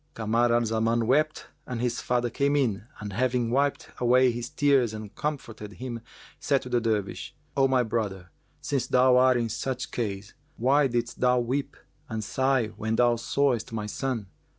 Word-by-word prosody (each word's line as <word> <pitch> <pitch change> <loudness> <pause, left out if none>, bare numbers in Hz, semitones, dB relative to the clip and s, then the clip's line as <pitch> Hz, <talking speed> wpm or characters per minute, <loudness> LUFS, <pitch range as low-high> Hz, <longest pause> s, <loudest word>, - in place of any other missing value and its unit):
Kamar 115 +2 +1
al 120 0 +3
Zaman 115 +1 +1
wept 155 +6 +1 0.2
and 125 -2 -4
his 120 0 -1
father 120 -1 0
came 140 +3 +1
in 115 -6 0
and 105 -2 -6
having 125 +1 0
wiped 140 +2 0
away 125 +1 +4
his 120 0 -5
tears 135 -6 +2
and 105 -2 -8
comforted 115 -8 -5
him 120 -1 -6 0.4
said 140 -2 +1
to 125 - -8
the 120 -1 +1
Dervish, 110 -3 -2 0.2
"O 135 -1 +4
my 130 -2 +3
brother, 100 -6 -3 0.3
since 135 -3 -1
thou 125 0 +5
art 130 0 +5
in 120 -1 0
such 125 +3 -4
case, 100 -3 -4 0.2
why 135 +4 +3
didst 120 -1 -2
thou 125 0 +3
weep 130 +4 -2 0.3
and 110 -1 -3
sigh 130 0 +1
when 110 +1 -1
thou 120 0 +4
sawest 125 -1 0
my 110 -2 -3
son? 115 +1 -3
120 Hz, 175 wpm, -27 LUFS, 110-130 Hz, 0.4 s, thou